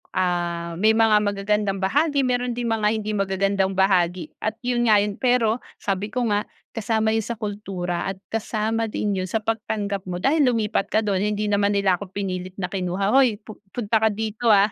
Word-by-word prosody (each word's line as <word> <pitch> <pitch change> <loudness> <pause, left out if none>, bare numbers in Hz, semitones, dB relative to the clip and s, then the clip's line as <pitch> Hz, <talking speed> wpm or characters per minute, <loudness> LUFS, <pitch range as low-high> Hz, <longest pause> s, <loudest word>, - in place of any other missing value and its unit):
ah, 170 -2 -1
may 220 +2 +4
mga 220 -2 +5
magagandang 200 -1 -1
bahagi, 285 +7 +2
meron 245 -1 0
ding 235 -1 -2
mga 215 -2 +1
hindi 215 -1 -3
magagandang 195 -1 0
bahagi, 180 -3 +2
at 215 0 -2
yun 240 -1 +1
nga 210 -2 +5
yun. 205 -1 -4
Pero 245 -2 +2 0.2
sabi 195 +1 -1
ko 235 0 -1
nga, 205 0 0 0.3
kasama 220 -1 0
yun 225 - +1
sa 235 +2 -5
kultura 195 -5 -3
at 195 - -5 0.2
kasama 225 0 -1
din 210 -1 -1
yun 185 -1 -2
sa 220 - +1
pagtanggap 205 -3 -2
mo 175 - -3
dahil 285 - +2
lumipat 220 -4 0
ka 220 0 +1
dun. 195 -2 +1
Hindi 210 0 0
naman 205 -1 +2
nila 200 -3 +2
ako 200 - -7
pinilit 185 -1 -4
na 190 - -2
kinuha, 195 +2 -1
hoy, 260 -5 +4
pu 215 - -11
punta 225 0 0
ka 220 - +5
dito, 220 +2 -3
ah? 205 0 +5
210 Hz, 190 wpm, -23 LUFS, 195-225 Hz, 0.3 s, mga